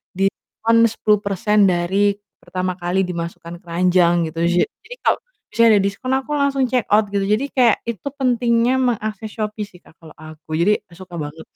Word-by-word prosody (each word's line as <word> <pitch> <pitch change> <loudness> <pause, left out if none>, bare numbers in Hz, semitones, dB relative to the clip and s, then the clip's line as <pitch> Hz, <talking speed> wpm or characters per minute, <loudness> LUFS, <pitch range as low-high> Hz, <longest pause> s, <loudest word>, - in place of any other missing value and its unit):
diskon 225 +4 +1
10% 210 -1 +2
dari 190 +3 +1 0.2
pertama 185 0 -4
kali 180 +2 0
dimasukkan 170 -1 -6
keranjang, 175 -1 +2
gitu. 165 - -7
Ja 175 +1 +3 0.2
jadi - - -8
kalau - - +2 0.3
misalnya 230 0 +4
ada - - +2
diskon, 200 +6 -3
aku 270 +2 -3
langsung 280 -1 +1
check 250 -3 +1
out 210 0 +4
gitu, 200 0 -1
jadi 210 +7 +1
kayak 245 -4 +4
itu 230 0 -5
pentingnya 240 -1 +2
mengakses 220 -4 -2
Shopee 215 -1 -4
sih, 185 -3 -18
Kak, 165 - -22
kalau 160 -2 -14
aku, 155 0 -11
jadi 205 +5 +3
suka 180 +1 -11
banget. 155 +1 -7
200 Hz, 165 wpm, -20 LUFS, 175-230 Hz, 0.3 s, misalnya